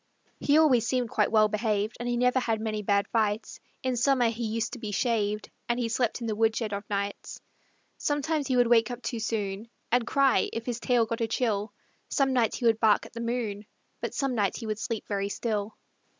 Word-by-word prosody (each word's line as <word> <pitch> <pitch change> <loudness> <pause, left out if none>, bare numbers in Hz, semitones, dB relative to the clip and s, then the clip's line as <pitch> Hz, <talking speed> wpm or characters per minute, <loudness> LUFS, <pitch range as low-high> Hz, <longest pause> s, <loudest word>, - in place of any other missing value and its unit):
He 290 +1 +3
always 255 -8 +4
seemed 245 -1 0
quite 210 - +1
well 215 -1 +5
behaved, 215 0 -1
And 240 0 -3
he 240 - 0
never 250 +1 +3
had 225 -3 -1
many 215 -1 -2
bad 200 0 +1
fights; 215 -1 -1 0.2
In 255 -1 0
summer 245 -1 +3
he 230 +1 -3
used 225 +1 -2
to 250 - -6
be 215 -3 -5
shaved 210 -1 0 0.2
And 240 +1 +1
he 235 -2 -1
slept 235 +1 0
in - - -3
the 220 -2 -1
woodshed 225 0 +1
o' 200 - -2
nights. 200 0 -3 0.6
Sometimes 295 0 0
he 260 -2 +1
would 245 - +5
wake 230 0 +4
up 245 0 -6
too 235 - -3
soon 215 -1 -3 0.2
And 240 0 +2
cry, 275 -1 +3
if 230 0 -4
his 245 -1 -3
tail 240 -1 +2
got 230 +1 -4
a 225 - +1
chill; 215 -3 -1 0.4
Some 270 -2 +2
nights 235 -4 +2
he 245 - -3
would 225 -1 +4
bark 220 -2 +4
at - - -13
the 235 - -5
moon, 225 -4 -3 0.3
But - - -4
some 275 -2 0
nights 205 -5 0
he 230 - -7
would 215 -1 -3
sleep 225 -1 -4
very 200 -1 -1
still. 210 -1 -3
230 Hz, 220 wpm, -28 LUFS, 215-245 Hz, 0.6 s, well